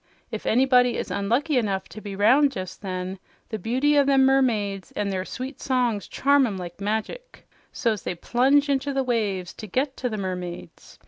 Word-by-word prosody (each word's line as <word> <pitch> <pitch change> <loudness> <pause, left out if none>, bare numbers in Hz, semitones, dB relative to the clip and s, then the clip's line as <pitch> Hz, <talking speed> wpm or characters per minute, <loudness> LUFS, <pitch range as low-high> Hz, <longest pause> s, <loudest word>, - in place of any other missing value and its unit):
If - - -5
anybody 250 0 +4
is - - -4
unlucky 255 +9 +1
enough 195 -4 -2
to 205 +6 -10
be 205 -2 -6
'round 270 +8 +4
jes' 185 -1 -5
then, 185 -1 -5 0.3
the 220 - -4
beauty 260 +8 +2
o' - - +5
them 270 -1 +4
mermaids 215 -8 +1
an' 205 -1 -2
their 190 -1 -2
sweet 260 +5 -7
songs 245 -6 0
charm 280 -1 +3
'em 200 -4 -4
like 175 +1 -8
magic; 220 - -4 0.2
so's 230 -7 -1
they 180 - -4
plunge 270 - +2
into 280 0 0
the 270 0 +1
waves 205 -7 -1
to 215 - -9
get 260 +7 -1
to 250 - -2
the 215 - -4
mermaids. 180 -3 -6
230 Hz, 185 wpm, -24 LUFS, 195-270 Hz, 0.3 s, o